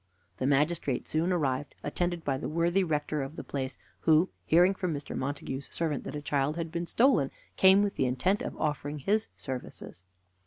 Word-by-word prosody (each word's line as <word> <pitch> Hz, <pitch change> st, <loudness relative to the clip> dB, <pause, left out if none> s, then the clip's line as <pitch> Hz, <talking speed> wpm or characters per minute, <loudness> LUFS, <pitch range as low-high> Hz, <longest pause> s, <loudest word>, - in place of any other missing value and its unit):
The 130 Hz, -, 0 dB
magistrate 145 Hz, -1 st, +1 dB
soon 165 Hz, +4 st, +1 dB
arrived, 145 Hz, -5 st, -1 dB
attended 175 Hz, +3 st, -1 dB
by 135 Hz, -3 st, -1 dB
the -, -, -4 dB
worthy 170 Hz, +4 st, +2 dB
rector 150 Hz, -2 st, -1 dB
of 135 Hz, +3 st, -5 dB
the -, -, -6 dB
place, 130 Hz, -2 st, -4 dB, 0.2 s
who, 160 Hz, +3 st, +4 dB, 0.2 s
hearing 175 Hz, +4 st, +5 dB
from 180 Hz, -4 st, -2 dB
Mr. 145 Hz, -, -5 dB
Montague's 140 Hz, 0 st, -4 dB
servant 155 Hz, -5 st, -2 dB
that -, -, -5 dB
a 145 Hz, -, -5 dB
child 145 Hz, +1 st, 0 dB
had 165 Hz, -1 st, -4 dB
been 170 Hz, 0 st, -3 dB
stolen, 230 Hz, -, +4 dB, 0.3 s
came 190 Hz, +1 st, +6 dB
with 205 Hz, -, -2 dB
the 130 Hz, -, +2 dB
intent 180 Hz, +11 st, +1 dB
of -, -, -5 dB
offering 150 Hz, -1 st, -2 dB
his 210 Hz, +10 st, +1 dB
services. 125 Hz, -8 st, -6 dB
155 Hz, 185 wpm, -29 LUFS, 140-175 Hz, 0.3 s, came